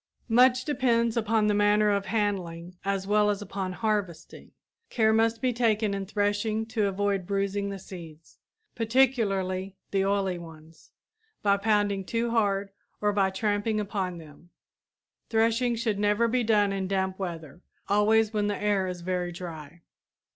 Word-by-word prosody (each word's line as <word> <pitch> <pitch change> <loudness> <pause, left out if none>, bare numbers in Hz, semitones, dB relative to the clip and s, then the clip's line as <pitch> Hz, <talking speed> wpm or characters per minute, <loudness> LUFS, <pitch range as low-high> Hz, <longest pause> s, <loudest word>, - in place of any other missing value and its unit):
Much 255 +2 +4
depends 235 -6 +1
upon 220 -1 +1
the 210 - +2
manner 205 0 +3
of 200 -1 -1
handling 185 -5 -2
as 195 -1 -1
well 210 +1 +3
as 205 -1 0
upon 195 -2 -4
harvesting. 205 -4 -3 0.4
Care 220 -2 +2
must 225 +1 +1
be 255 -1 +2
taken 220 -3 +1
in 195 -1 -4
threshing 205 +2 0
to 220 -2 0
avoid 195 -1 -1
bruising 200 0 -1
the 200 - -5
seeds, 165 -4 -12 0.3
particularly 205 -6 +1 0.2
the 195 -1 +1
oily 195 -2 0
ones, 160 -1 -14 0.5
by 200 -1 +4
pounding 205 -1 +1
too 230 +4 -2
hard 200 -3 +1 0.3
or 210 0 +1
by 195 -1 +2
tramping 210 +2 -1
upon 195 -4 -3
them. 160 +1 -14 0.8
Threshing 230 +2 +2
should 220 -3 -1
never 210 +3 +2
be 245 +1 +1
done 210 -3 +2
in 190 -1 -2
damp 190 0 -1
weather; 170 -3 -6 0.3
always 215 +2 +3
when 210 -1 0
the 205 - -1
air 205 -2 +1
is 180 -1 -5
very 180 0 -2
dry. 170 -2 -9
205 Hz, 150 wpm, -27 LUFS, 190-220 Hz, 0.8 s, Much